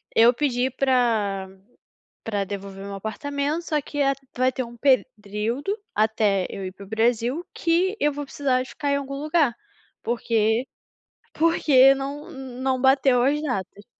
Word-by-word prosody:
eu 235 +2 +7
pedi 255 -2 0
pra 230 -8 +1 0.7
pra 205 -3 -1
devolver 195 0 -7
o - - -7
meu 200 - -6
apartamento, 285 - -3
só 305 -3 -1
que 290 +1 -7
a 275 - +3 0.2
vai 255 +1 +3
ter 255 - -3
um 235 0 -11
período 245 - 0 0.2
até 215 -3 +2
eu 195 - -6
ir 185 - -8
para 200 - -12
o 195 - -17
Brasil, 235 +7 +1
que 355 +5 +1
eu 295 0 +2
vou 290 0 -5
precisar 265 -2 0
ficar 285 +2 -3
em 280 - +2
algum 275 0 -5
lugar, 295 -4 +1 0.5
porque 230 0 +1 0.7
porque 275 -5 +5
não 280 +4 -6
não 260 -1 -3
bateu 265 -2 +4
as 290 +3 +2
datas." 205 -7 -4
255 Hz, 155 wpm, -24 LUFS, 220-280 Hz, 0.7 s, eu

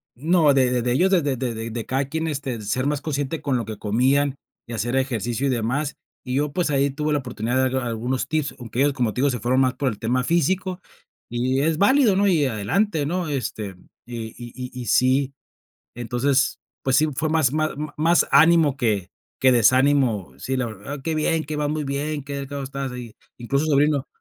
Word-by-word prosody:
No, 155 +2 +3
de 130 -2 +3
de 125 -1 +1
de 120 +1 0
ellos, 180 +9 +3
de 185 - +4
de 140 -3 -1
de 115 -3 -3
de 115 0 -5
cada 135 +2 -1
quien, 160 +2 -2
este, 135 -6 -3
ser 130 +7 -1
más 150 -1 -1
consciente 145 0 -3
con 135 -3 0
lo 115 - -3
que 110 0 -6
comían, 130 +7 +1 0.3
y 115 - -7
hacer 120 +3 -2
ejercicio 125 -1 -1
y - - +1
demás, 130 +5 -1 0.3
y 125 0 -3
yo 145 +1 0
pues 170 0 0
ahí 140 0 +2
tuve 150 +2 -2
la 145 - +2
oportunidad 125 -2 -3
de 130 - +2
dar 130 -1 -1
algunos 120 +3 -2
tips, 155 -1 -1
aunque 120 0 -6
ellos 145 0 +3
como 120 -5 0
te 125 - -2
digo 140 - +3
se 125 -3 -2
fueron 125 +4 +2
más 130 -1 +2
por 135 +1 0
el 105 - -6
tema 125 +3 0
físico 180 +4 0 0.5
y 130 +3 0
es 160 +1 +1
válido, 225 - +4
¿no? 200 +1 +3
Y 165 -7 +3
adelante, 145 - 0
¿no? 175 +3 -2
Este, 110 -8 -4 0.3
y 115 -2 -6
y 120 -1 -9
y 125 -1 -6
y 120 - -6
sí, 130 +4 +3 0.6
entonces, 125 +3 0 0.2
pues, 130 0 +2
sí 155 - +4
fue 155 +3 -1
más 155 -5 +2
más 155 0 0 0.3
más 165 +3 +3
ánimo 160 -3 +5
que 110 -8 0 0.3
que 130 - +5
desánimo. 125 - +3
Sí, 130 - -2
la 125 -2 -1
verdad, 115 +7 -7
qué 160 +2 -1
bien, 155 +1 +1
qué 155 +1 -4
vas 150 -1 -1
muy 155 0 -2
bien, 145 +1 -3
qué 140 0 -6
delgado 140 0 -5
estás 135 0 -4
y, 120 -3 -9 0.2
incluso 140 +5 0
el 155 - 0
sobrino: 145 -1 +2
135 Hz, 215 wpm, -23 LUFS, 120-150 Hz, 0.6 s, ánimo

